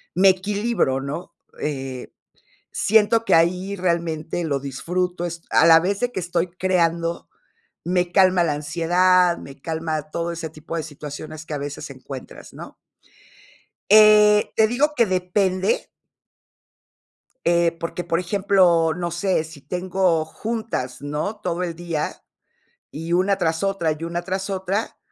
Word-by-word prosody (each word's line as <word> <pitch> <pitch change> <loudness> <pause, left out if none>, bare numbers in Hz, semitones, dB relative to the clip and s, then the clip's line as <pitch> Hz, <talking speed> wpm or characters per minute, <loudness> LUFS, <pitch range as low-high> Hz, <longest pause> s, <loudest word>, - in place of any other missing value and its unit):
me 190 +2 +6
equilibro, 200 - 0
¿no? 145 +6 -6 0.3
Eh, 135 -3 -4 0.6
siento 220 +2 +3
que - - +3
ahí 180 +4 +2
realmente 170 -2 -2
lo 140 -4 -1
disfruto 175 +7 -3
est 170 -1 -6
a - - +5
la 165 0 +8
vez 195 +3 -1
de 245 0 -1
que 190 - -3
estoy 175 0 -1
creando, 170 -2 0 0.6
me 180 0 0
calma 185 -2 +4
la 155 - +1
ansiedad, 175 +4 +2
me 140 0 -12
calma 160 -1 -3
todo 170 0 -2
ese 165 -1 -5
tipo 155 +2 -7
de 165 - -2
situaciones 155 +1 -8
que 155 - -5
a 145 - -2
veces 145 +1 -6
encuentras, 135 0 -10
¿no? - - -10 1.2
Eh, 210 0 +7
te 220 - +4
digo 280 +6 +1
que 235 -5 +3
depende 185 +1 0 1.6
eh, 170 0 +3
porque, 170 +1 -4
por 165 0 0
ejemplo, 180 -3 +3
no 175 0 -4
sé, 175 -1 0
si 160 -3 -12
tengo 180 -2 0
juntas, 215 - -4
¿no?, 150 +9 -3
todo 180 0 -3
el 170 -2 -4
día, 165 -3 -4 0.7
y 165 +3 -5
una 190 +2 +2
tras 160 -2 0
otra, 195 -5 0
y 165 - -5
una 170 +1 -3
tras 190 +2 -3
otra 195 +3 -2
175 Hz, 145 wpm, -22 LUFS, 160-190 Hz, 1.6 s, la